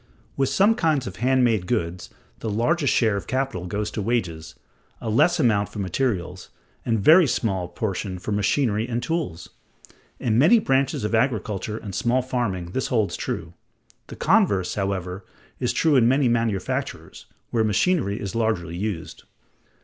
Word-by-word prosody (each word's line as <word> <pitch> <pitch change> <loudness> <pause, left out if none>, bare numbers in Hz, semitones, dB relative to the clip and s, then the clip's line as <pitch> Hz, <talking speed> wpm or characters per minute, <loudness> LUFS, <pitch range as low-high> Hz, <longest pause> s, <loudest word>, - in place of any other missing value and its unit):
With 135 -1 +1
some 205 +3 +4
kinds 160 - +1
of 95 -2 -7
hand 130 +3 +2
made 110 -7 +1
goods 90 -6 -2 0.3
the 110 - -4
largest 135 +8 +1
share 110 -4 +2
of 100 - -6
capital 130 -9 -2
goes 105 +3 -3
to 110 - -3
wages, 85 -8 -2 0.4
a 110 - -3
less 170 +10 +3
amount 105 -4 +2
for - - -11
materials, 95 -3 -2 0.3
and 115 -1 +1
a - - -3
very 160 - +7
small 95 -7 -1
proportion 95 0 -3
for 95 +4 -6
machinery 105 +2 +1
and 120 0 -2
tools. 145 - -3 0.7
In 115 -1 +1
many 170 - +6
branches 135 - +1
of 105 - -2
agriculture 110 -3 0
and 100 -3 -8
small 125 +6 +1
farming 105 -9 -2
this 130 - -2
holds 110 -5 0
true. 80 0 -5 0.5
The - - -9
converse, 95 -3 +2
however, 95 -1 -3 0.4
is - - 0
true 160 -3 +2
in 120 -3 +5
many 135 +1 +3
manufactures, 115 -5 -2 0.2
where 115 -2 +2
machinery 110 - +1
is 100 -2 -5
largely 110 -8 -1
used. 95 -3 -5
110 Hz, 160 wpm, -24 LUFS, 95-130 Hz, 0.7 s, very